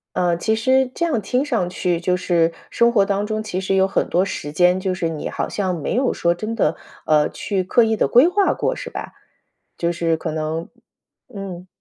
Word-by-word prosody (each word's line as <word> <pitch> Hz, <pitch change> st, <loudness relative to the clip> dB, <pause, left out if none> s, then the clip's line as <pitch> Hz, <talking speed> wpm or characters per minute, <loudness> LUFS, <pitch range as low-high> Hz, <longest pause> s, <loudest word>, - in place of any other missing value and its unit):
呃， 175 Hz, -1 st, +2 dB
其 220 Hz, +5 st, 0 dB
实 260 Hz, +3 st, +2 dB
这 340 Hz, -, 0 dB
样 290 Hz, -10 st, 0 dB
听 250 Hz, +7 st, 0 dB
上 230 Hz, -11 st, 0 dB
去 180 Hz, -1 st, -1 dB
就 180 Hz, +1 st, 0 dB
是 170 Hz, -2 st, +2 dB, 0.2 s
生 235 Hz, 0 st, +3 dB
活 205 Hz, -4 st, +3 dB
当 200 Hz, +1 st, -1 dB
中 215 Hz, 0 st, -2 dB
其 190 Hz, -3 st, -3 dB
实 195 Hz, 0 st, 0 dB
有 190 Hz, 0 st, +4 dB
很 -, -, 0 dB
多 180 Hz, +2 st, +2 dB
时 145 Hz, -6 st, -5 dB
间， 180 Hz, +3 st, +3 dB
就 190 Hz, 0 st, -1 dB
是 170 Hz, -3 st, -1 dB
你 160 Hz, -2 st, -4 dB
好 -, -, -3 dB
像 190 Hz, -3 st, -2 dB
没 150 Hz, -, -3 dB
有 260 Hz, +1 st, +2 dB
说 170 Hz, 0 st, +1 dB
真 215 Hz, +6 st, -4 dB
的， 230 Hz, -, +1 dB, 0.3 s
呃， 150 Hz, -1 st, +3 dB
去 195 Hz, -2 st, -2 dB
刻 230 Hz, +6 st, +3 dB
意 225 Hz, 0 st, +1 dB
地 -, -, +1 dB
规 250 Hz, +7 st, +6 dB
划 390 Hz, +2 st, +2 dB
过 -, -, -1 dB
是 -, -, -7 dB
吧？ -, -, -7 dB, 0.6 s
就 170 Hz, 0 st, 0 dB
是 165 Hz, -1 st, 0 dB
可 160 Hz, 0 st, -4 dB
能 155 Hz, +1 st, -3 dB, 0.7 s
嗯。 190 Hz, -3 st, -7 dB
190 Hz, 235 characters per minute, -21 LUFS, 170-225 Hz, 0.7 s, 规